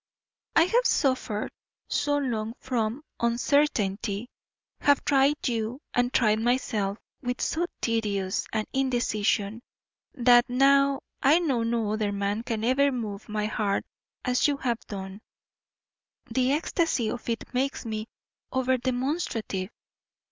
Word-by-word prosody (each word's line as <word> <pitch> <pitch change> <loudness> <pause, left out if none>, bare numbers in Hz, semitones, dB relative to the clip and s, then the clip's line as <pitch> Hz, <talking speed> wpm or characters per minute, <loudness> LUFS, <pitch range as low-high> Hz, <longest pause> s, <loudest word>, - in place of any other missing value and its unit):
I 325 - +7
have 475 +8 +3
suffered 255 -6 0 0.4
so 290 0 +1
long 230 -5 -2
from 240 +2 -2 0.2
uncertainty, 235 -4 +1 0.5
have 285 -1 +3
tried 280 +1 +3
you 230 +1 -2
and 245 0 +2
tried 215 -4 +3
myself 220 -4 0 0.2
with 245 0 -3
so 345 +2 0
tedious 205 -5 -1
an 215 -1 -1
indecision, 230 -4 0 0.5
that, 245 -1 +5
now 275 +2 +4 0.2
I 285 +4 +6
know 285 -9 +1
no 230 -2 0
other 215 -1 0
man 200 +2 -1
can 225 -2 -3
ever 275 +4 +3
move 215 -5 -5
my 210 0 -1
heart 210 -2 -1 0.4
as 250 +2 +3
you 290 -1 0
have 240 -4 -1
done, 195 0 -7 1.1
the 260 0 +2
ecstasy 305 -5 +1
of 245 0 -6
it 230 +2 -3
makes 265 +1 -1
me 215 -1 -4 0.4
over 260 0 +1
demonstrative. 245 - -2
240 Hz, 125 wpm, -27 LUFS, 215-270 Hz, 1.1 s, I